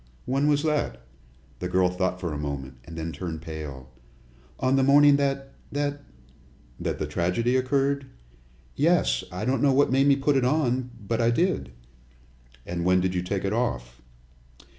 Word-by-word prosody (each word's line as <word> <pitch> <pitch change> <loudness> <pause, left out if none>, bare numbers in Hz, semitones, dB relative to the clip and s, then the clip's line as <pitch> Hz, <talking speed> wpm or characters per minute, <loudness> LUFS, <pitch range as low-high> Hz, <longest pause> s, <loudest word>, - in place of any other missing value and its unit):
"When 135 +3 +1
was 145 0 +2
that?" 65 - -1 0.6
The 90 - -3
girl 90 0 +3
thought 90 0 -1
for 85 -4 -3
a - - -3
moment, 70 -3 -4
and 85 - -10
then 80 0 -3
turned 80 0 -6
pale. 75 -5 -7 0.7
"On 130 0 +2
the 135 - +3
morning 140 +1 +6
that 135 -1 -1 0.2
that 145 0 -2 0.4
" 60 -1 -29
"That - - -2
the - - -2
tragedy 105 +9 0
occurred?" 135 +1 +1 0.7
"Yes. - - +2
I 90 +4 -4
don't 130 +2 +1
know 140 -2 +4
what 140 0 +3
made 135 +1 +4
me 140 - +6
put 140 0 +1
it 130 - +2
on, 130 -2 +1 0.2
but 115 +2 0
I 115 - +3
did." 120 - 0 0.9
"And 85 0 -3
when 90 +1 +4
did 90 0 0
you 90 - 0
take 95 +2 -3
it 100 - 0
off?" 60 - -2
110 Hz, 175 wpm, -26 LUFS, -, 0.9 s, morning